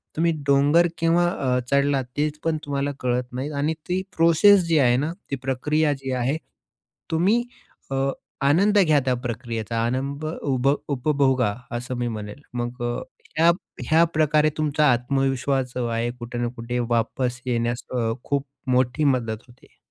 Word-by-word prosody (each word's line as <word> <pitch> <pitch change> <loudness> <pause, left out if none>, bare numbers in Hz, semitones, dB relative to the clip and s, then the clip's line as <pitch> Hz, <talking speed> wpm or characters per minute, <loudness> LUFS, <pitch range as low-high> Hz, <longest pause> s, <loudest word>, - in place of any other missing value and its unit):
तुम्ही 165 +1 +2 0.2
डोंगर 145 +5 +5
केव्हा 165 +1 +3
अ, 130 -7 0
चढला 140 -1 +3 0.2
तेच 150 0 -1
पण 160 -1 +1
तुम्हाला 140 0 -1
कळत 125 0 0
नाही 135 +4 -3
आणि 155 +3 +1 0.2
ती 185 +1 +1 0.2
प्रोसेस 175 +4 +6
जी 165 - +3
आहे 125 -2 +4
ना, 150 +5 -1 0.2
ती - - +1
प्रक्रिया 150 +3 +1
जी 135 - -3
आहे. 135 +6 0 0.7
तुम्ही 195 +9 +3 0.5
अ, 135 - -1 0.5
आनंद 200 +8 +4
घ्या 155 -4 +4
त्या 130 - +2
प्रक्रियेचा, 115 -1 -4
आनंद 140 +5 -2
उभ 135 -4 -1 0.2
उपभोगा, 130 -5 +2 0.2
असं 125 +1 -5
मी 120 0 -1
म्हणेल. 105 +2 -6
मग 120 0 -4
अ, 120 0 -1 0.4
ह्या 165 +1 +6 0.4
ह्या 165 +1 +6
प्रकारे 155 0 +3
तुमचा 150 -1 +3
आत्मविश्वास 135 +1 0
जो 125 -1 -1
आहे 115 +1 -1
कुठे 120 0 -6
ना 120 - 0
कुठे 120 +1 -3
वापस 125 +2 -1
येण्यास 120 -1 -1
अ, 115 -3 0
खूप 140 0 -1 0.3
मोठी 125 +4 +2
मदत 120 -5 0
होते. 125 0 -21
135 Hz, 155 wpm, -24 LUFS, 125-155 Hz, 0.7 s, प्रोसेस